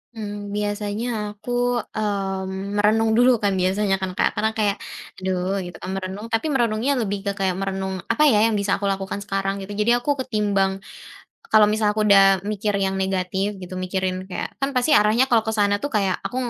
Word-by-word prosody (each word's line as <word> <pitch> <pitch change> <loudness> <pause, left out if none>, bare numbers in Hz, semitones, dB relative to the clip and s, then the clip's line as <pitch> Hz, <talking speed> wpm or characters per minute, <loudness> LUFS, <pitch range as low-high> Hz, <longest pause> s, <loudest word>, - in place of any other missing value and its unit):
Mmm, 205 -2 -6
biasanya 205 +2 -2 0.3
aku, 215 +4 -8 0.4
mmm, 195 -1 -3
merenung 220 +2 +3
dulu 250 +1 +6
kan 200 - +3
biasanya 195 +2 +1
kan, 190 -1 -2
Kak. - - +3
Karena 220 +1 +1
kayak 205 -2 +1 0.4
aduh 185 +1 -1
gitu 175 - -9
kan, - - -5
merenung, 195 +3 -5
tapi 225 +7 0
merenungnya 235 0 +1
lebih 205 -2 -2
ke 200 - +2
kayak 190 -2 +1
merenung 190 -1 -3
apa 265 +7 +2
ya, 210 - +4
yang 225 - 0
bisa 200 -1 -1
aku 200 - -3
lakukan 195 0 -2
sekarang 195 -1 -1
gitu. 195 +1 -8
Jadi 210 +3 +2
aku 290 - -5
ketimbang, 200 -5 0 0.7
kalau 215 -1 +7
misal 210 -1 +1
aku 215 - -2
udah 195 -1 +6
mikir 210 0 -1
yang 195 0 0
negatif 190 +1 -1
gitu, 185 0 -7
mikirin 185 0 -2
kayak, 185 -2 -6
kan 275 0 -2
pasti 255 +3 +3
arahnya 220 +5 +3
kalau 230 -3 +3
ke 220 - -2
sana 205 -2 +2
tuh 285 - -3
kayak 195 -4 +1
aku 250 - -4
200 Hz, 190 wpm, -22 LUFS, 190-215 Hz, 0.7 s, kalau